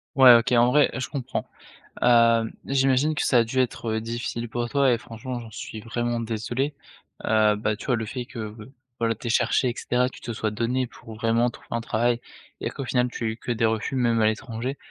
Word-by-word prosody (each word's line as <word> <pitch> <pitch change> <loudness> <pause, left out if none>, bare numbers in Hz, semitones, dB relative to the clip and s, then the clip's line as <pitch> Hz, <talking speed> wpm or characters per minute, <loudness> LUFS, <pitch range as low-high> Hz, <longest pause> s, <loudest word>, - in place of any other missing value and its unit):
Ouais, 130 -2 +9
OK, 120 +2 +4
en 120 0 +5
vrai, 150 +1 +5
je 130 - -3
comprends. 130 -2 -3 0.6
Hem, 115 -2 +5 0.2
j'imagine 135 +2 +2
que - - 0
ça 125 - +4
a - - +5
dû 115 +3 -5
être, 120 -2 -1
heu, - - 0
difficile 115 +1 -4
pour 120 +1 -3
toi, 140 -2 +3
et 115 - -1
franchement, 120 +2 -6
j'en 115 -1 -9
suis 110 0 -7
vraiment 120 +1 -2
désolé. 115 +5 -2 0.5
Heu, 110 -1 +4
bah, 105 0 -1
tu 105 - -10
vois? 125 - +3
Le 110 -1 -3
fait 125 +3 -5
que 115 -5 -6
b 110 0 -11 0.3
voilà, 115 -1 +1
tu 110 - -14
aies - - -1
cherché, 120 +2 +2
et - - -2
cetera, 125 +1 +1
tu 130 - -10
te 120 - -5
sois 110 -1 -2
donné 120 +4 0
pour 115 -2 -12
vraiment 115 +2 +2
trouver - - -15
un 115 - -1
travail, 120 +1 0 0.4
et - - -1
qu'au 135 - -6
final, 125 0 +1
tu 120 - -6
as - - +1
eu 110 0 -3
que 120 - -4
des 115 -1 +1
refus, 110 +4 -1
même 120 -3 +2
à 110 - +5
l'étranger, 115 +4 -3
120 Hz, 235 wpm, -25 LUFS, 115-125 Hz, 0.6 s, Ouais